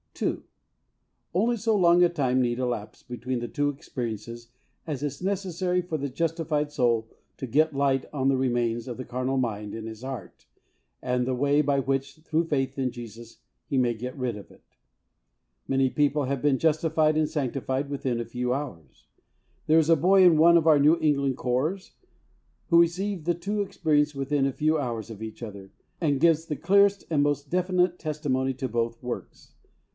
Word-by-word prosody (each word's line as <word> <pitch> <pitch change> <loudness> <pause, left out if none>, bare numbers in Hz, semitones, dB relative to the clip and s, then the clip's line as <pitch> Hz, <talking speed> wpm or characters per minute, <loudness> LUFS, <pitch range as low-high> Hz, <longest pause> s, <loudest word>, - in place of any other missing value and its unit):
(2.) - - -2 0.9
Only 230 +7 +2
so 225 0 +1
long 175 -2 +5
a 175 - +5
time 130 -6 +1
need 120 0 0
elapse 120 -4 -3
between 125 0 -4
the 120 - -4
two 145 +5 0
experiences 120 -5 -6 0.4
as 145 -5 -4
is 145 +1 -4
necessary 185 -2 -1
for 170 -3 -4
the 140 -1 -3
justified 155 0 -1
soul 115 -5 +1 0.3
to 130 - -5
get 155 +4 +2
light 135 -1 +1
on 135 -3 -1
the 135 - +3
remains 120 -2 0
of 120 - -5
the 130 - -6
carnal 130 +2 -2
mind 105 -5 -2
in 110 -1 -6
his 110 0 -9
heart 130 -8 -8 0.5
and 125 -1 0
the 130 0 -1
way 145 +3 +3
by 140 -1 +1
which, 135 +1 -2
through 160 +1 -1
faith 145 -5 -1
in 130 -2 -1
Jesus, 115 -1 -10 0.3
he 135 - -1
may 125 -2 +2
get 125 +3 -6
rid 125 -4 -2
of 100 - -12
it. - - -20 1.0
Many 135 -1 +2
people 145 +1 +1
have 135 0 -2
been 145 -2 +2
justified 155 -1 +2
and 155 -1 +1
sanctified 135 0 -2
within 130 -4 -2
a 120 - -3
few 125 +2 -2
hours. 125 - -7 0.6
There 160 +1 +6
is 160 0 +1
a 165 - +7
boy 185 +5 +5
in 175 -3 +6
one 170 +2 +7
of 165 -1 +1
our 155 -2 +6
New 155 +4 +4
England 140 -4 +1
Corps 150 +11 -2 0.8
who 170 -1 +7
received 180 0 -1
the 175 0 +1
two 205 +5 -2
experiences 150 -6 +1
within 135 0 0
a 135 - +1
few 155 +3 +1
hours 115 -5 -4
of 110 -2 -9
each 110 +1 -7
other, 100 -3 -9 0.3
and 145 -5 +1
gives 165 0 +3
the 150 - -3
clearest 200 +6 +3
and 150 -3 +2
most 145 -1 -1
definite 180 0 +1
testimony 140 -4 -1
to 130 +1 -3
both 115 0 -2
works. 125 -1 -7
140 Hz, 185 wpm, -26 LUFS, 125-160 Hz, 1.0 s, a